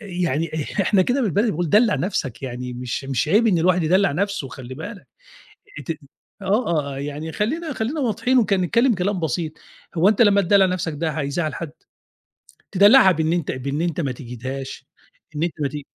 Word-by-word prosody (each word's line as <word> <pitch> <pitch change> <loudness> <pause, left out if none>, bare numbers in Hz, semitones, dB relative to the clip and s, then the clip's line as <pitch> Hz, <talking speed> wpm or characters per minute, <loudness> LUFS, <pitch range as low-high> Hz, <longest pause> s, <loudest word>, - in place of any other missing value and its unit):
يعني 175 - -2
إح 200 - -3
إحنا 195 0 +3
كده 250 +8 0
بالبلدي 210 +1 +1
بنقول 170 -1 -2
دلّع 215 0 +4
نفسك 145 - -3
يعني 125 -1 -5
مش 125 +2 -4
مش 135 +1 -1
عيب 215 +7 +4
إن 190 -6 +3
الواحد 180 +1 +2
يدلّع 185 +1 +3
نفسه 200 -2 -2
وخلّي 130 -1 -9
بالك. 185 - -8 0.7
أنت 145 - -7 0.5
آه 210 +5 +1
آه 145 -4 -1
آه - - -6
يعني 145 +3 -5
خلينا 305 - -2
خلينا 260 +6 -2
واضحين 255 +1 +1
وك 215 -4 +1
نتكلم 230 +7 +3
كلام 190 0 -1
بسيط، 160 +1 -2 0.4
هو 175 +3 +4
أنت 215 +2 +4
لما 200 -2 +5
تدلّع 195 +1 +4
نفسك 180 -3 -2
ده 160 +2 -2
هيزعّل 155 +1 -2
حد؟ 165 -3 -5 1.0
تدلّعها 200 +1 +7
بإن 160 0 0
أنت 170 -4 -1
بإن 140 +3 -3
أنت 170 -1 -1
ما 140 -5 -1
تجهدهاش 130 +2 -7 0.5
إن 150 - -2
أنت 170 0 0
ما 145 - +1
تج 145 +2 -6
175 Hz, 185 wpm, -22 LUFS, 145-205 Hz, 1.0 s, تدلّعها